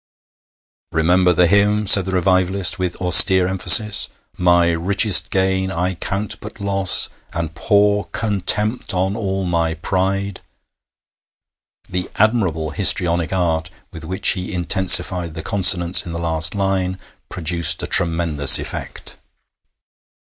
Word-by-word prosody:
'Remember 90 +3 0
the 90 +1 +1
hymn,' 105 +3 0
said 100 -1 +5
the 95 - -6
revivalist, 95 +1 0
with 90 -1 -4
austere 90 +1 +5
emphasis: 95 +3 +4 0.3
'"My 85 -1 +1
richest 95 +5 +2
gain 95 0 -2
I 90 +1 -4
count 100 +4 -6
but 105 +1 -12
loss, 100 -2 +4 0.3
And 85 -1 -6
pour 105 +3 -1
contempt 105 +1 -1
on 95 +2 -3
all 95 -3 -5
my 85 -2 -3
pride."' 95 +3 -4 1.5
The 90 0 -6
admirable 95 -9 -2
histrionic 85 +1 0
art 85 -3 -3 0.2
with 80 - -12
which 95 +4 -1
he 90 -1 -2
intensified 90 -2 +2
the 80 - -8
consonants 90 -3 +3
in 85 - -8
the - - -6
last 80 +2 -2
line 95 -2 -3 0.3
produced 85 -1 -1
a - - -3
tremendous 80 -5 +3
effect. - - -8
90 Hz, 120 wpm, -17 LUFS, 85-100 Hz, 1.5 s, said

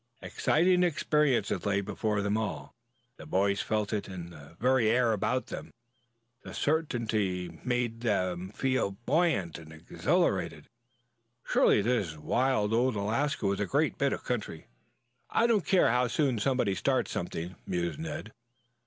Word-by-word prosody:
Exciting 180 +3 +2
experiences 150 - +1
lay 100 -1 +1
before 105 +1 -1
them 100 +1 0
all. 90 -11 -3 0.4
The - - -11
boys 100 +1 +1
felt 110 -1 -1
it 105 - -2
in 90 -3 -7
the 80 +1 -14
very 125 -2 +3
air 120 0 +3
about 125 +5 0
them. - - -8 0.7
The - - -9
certainty 110 - -1
made 120 -2 -1
them 95 -5 -1
feel 130 -3 -1
buoyant 125 - +1
and 80 -1 -13
exhilarated. 80 0 -1 0.8
Surely 105 - +3
this 100 -9 0
wild 115 - +1
old 120 +1 +2
Alaska 110 +6 -1
was 100 0 +1
a 105 - -1
great 145 +2 0
bit 140 0 +2
of - - -4
country! 105 -9 -4 0.6
"I 230 - +2
don't 225 -5 +2
care 185 -10 +4
how 125 +1 +2
soon 130 -1 0
somebody 125 -3 +1
starts 130 +4 0
something," 90 +1 -4
mused 85 - -2
Ned. 160 -9 -5
110 Hz, 145 wpm, -29 LUFS, 95-130 Hz, 0.8 s, care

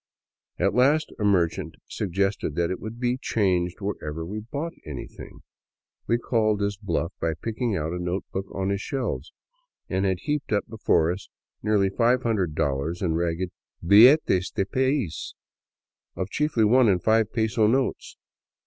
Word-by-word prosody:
At 100 +2 +1
last 140 +6 +3
a - - -2
merchant 90 -5 +1
suggested 95 -4 -1
that 85 +1 0
it 95 - -3
would 110 +2 -7
be 125 +1 0
changed 90 -5 0
wherever 80 -5 -4
we 105 +5 -5
bought 140 +10 -5
anything. 70 -5 -9 0.7
We 115 - +3
called 110 -3 +1
his 100 0 -1
bluff 100 -3 -2
by 80 -1 -1
picking 115 - -2
out 80 +1 -2
a 90 - -3
notebook 95 +2 -3
on 95 0 -2
his 100 0 -1
shelves, 135 +1 -3 0.6
and 95 +1 -1
had 95 -3 0
heaped 150 -1 -2
up 105 -1 +1
before 95 -7 +2
us 95 +3 -7 0.3
nearly 100 -2 +2
$500 90 - 0
in 85 -3 +1
ragged 85 +2 -1 0.2
" - - -16
billetes 105 - +6
del 95 - -1
pais 130 - -1 0.4
" - - -62
of 95 +1 -4
chiefly 150 -7 +1
one 120 +1 +5
and 90 -3 +1
five 110 -1 +3
peso 110 -1 +2
values. 130 +2 -1
100 Hz, 155 wpm, -25 LUFS, 90-115 Hz, 0.7 s, billetes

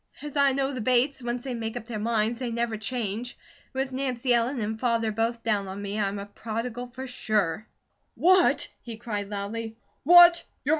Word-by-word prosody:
As 295 -1 -7
I 280 -1 +4
know 275 +1 0
the 255 - -4
Bates, 255 +4 +2
once 240 0 -3
they 265 - -4
make 225 0 -4
up 235 - -7
their 225 -2 -5
minds, 225 +1 0
they 250 -2 -2
never 235 -1 -1
change. 225 +1 -3 0.3
With 265 0 -2
Nancy 255 -1 0
Ellen 240 +3 +1
and 220 0 -3
Father 230 -2 +1
both 230 +2 -1
down 205 -3 0
on 190 +1 -6
me, 205 +1 -4
I'm 200 -1 -1
a 200 - -5
prodigal 230 +4 -5
for 260 +2 -8
sure." 215 -6 -1 0.5
"What?" 370 +1 +4
he 230 -2 -8
cried, 210 -3 -4
loudly. 220 +2 -5 0.2
"What? 345 +2 +8
235 Hz, 185 wpm, -26 LUFS, 215-255 Hz, 0.5 s, What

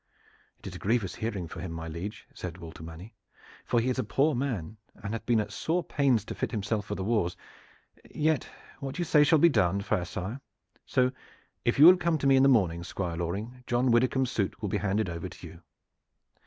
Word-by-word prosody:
"It - - -19
is - - -6
a - - -8
grievous 105 -3 0
hearing 105 -6 -3
for - - -9
him, 95 - -5
my 80 0 -5
liege," 85 +6 -6
said 90 -2 -6
Walter 80 -2 -10
Manny; 85 +7 -10 0.5
"for 120 - +1
he 115 - -1
is 130 0 0
a - - +1
poor 150 +3 +2
man 115 - -2 0.2
and 100 +1 -6
hath 115 - -5
been 120 -3 +4
at 105 - -2
sore 170 +2 -1
pains 130 -10 +1
to - - -5
fit - - -2
himself 105 -2 -2
for 105 - -3
the 95 - -4
wars. 105 -5 0 0.7
Yet 155 -1 0 0.3
what 135 +2 -5
you 175 - -1
say 150 -2 +5
shall 160 +2 +5
be 170 - +6
done, 100 - +2
fair 100 -3 -1
sire. 100 +9 -5 0.5
So, 130 0 +2 0.5
if 120 - +2
you 145 - +9
will 180 +2 +10
come 170 -2 +1
to 140 - -4
me 135 -1 +6
in 130 - +5
the 135 - +6
morning, 90 -9 +2
Squire 85 -1 -4
Loring, 105 +9 -4
John 120 +1 +2
Widdicombe's 125 +2 +2
suit 100 -1 -1
will 105 -3 -3
be 105 - 0
handed 105 +1 0
over 85 -1 -5
to - - -11
you." 85 - -13
110 Hz, 220 wpm, -28 LUFS, 95-130 Hz, 0.7 s, will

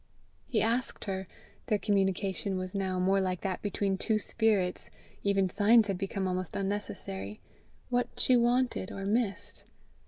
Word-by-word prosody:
He 225 - +1
asked 235 +2 -1
her 190 -2 -3 0.4
their 210 - +3
communication 195 -1 0
was 185 0 -3
now 190 -2 -1
more 195 +2 +3
like 185 -2 -1
that 190 -2 -2
between 200 -1 -1
two 220 -2 +2
spirits: 210 -4 0 0.3
even 195 -1 +2
signs 215 +4 +5
had 190 -2 -1
become 195 -1 -2
almost 185 -1 -2
unnecessary 150 - -4 0.5
what 245 0 +1
she 255 - +5
wanted 240 -4 +2
or 195 - -5
missed. 205 -1 -1
195 Hz, 145 wpm, -30 LUFS, 190-215 Hz, 0.5 s, signs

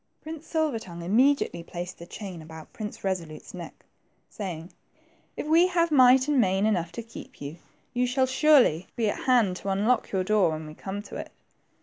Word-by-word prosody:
Prince 315 0 -8
Silver 315 -7 0
tongue 170 -5 -9
immediately 240 -1 +2
placed 175 +2 -7
the 170 - -10
chain 185 -5 -7
about 160 0 -11
Prince 210 -2 -7
Resolute's 175 -5 -4
neck, - - -10 0.5
saying, 180 -5 -6 0.6
If - - -3
we 330 +4 +5
have 340 -2 +1
might 260 -1 +6
and 290 -4 +3
main 190 0 +2
enough 175 -6 0
to 235 - -5
keep 230 - -12
you, 145 +3 -7 0.4
you 250 0 +1
shall 260 +1 +2
surely 260 - +4
be 220 -3 +1
at - - -7
hand 230 -8 +3
to 195 - -5
unlock 215 +5 +1
your 190 -2 +1
door 200 -2 +3
when 155 0 -5
we 155 - -9
come 195 +5 -6
to - - -8
it." - - -7
210 Hz, 190 wpm, -27 LUFS, 175-260 Hz, 0.6 s, might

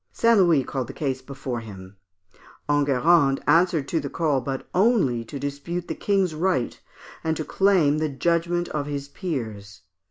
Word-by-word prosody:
St. 230 0 +3
Louis 170 -7 +4
called 130 -1 -4
the - - -8
case 135 -3 -3
before 135 -3 -5
him. 95 -3 -11 0.7
Enguerrand 145 0 +3
answered 165 -4 +3
to 165 - +1
the 140 -2 -5
call, 150 -4 0
but 135 +1 -5
only 180 - +2
to 140 - -7
dispute 145 +6 -4
the - - -2
King's 195 -4 0
right, 160 -6 -1 0.4
and 160 -1 -1
to 155 - -4
claim 175 -7 +3
the 155 -1 0
judgment 170 +4 0
of 145 -1 -3
his 140 -1 -4
peers. 110 - -5
145 Hz, 160 wpm, -24 LUFS, 135-175 Hz, 0.7 s, Louis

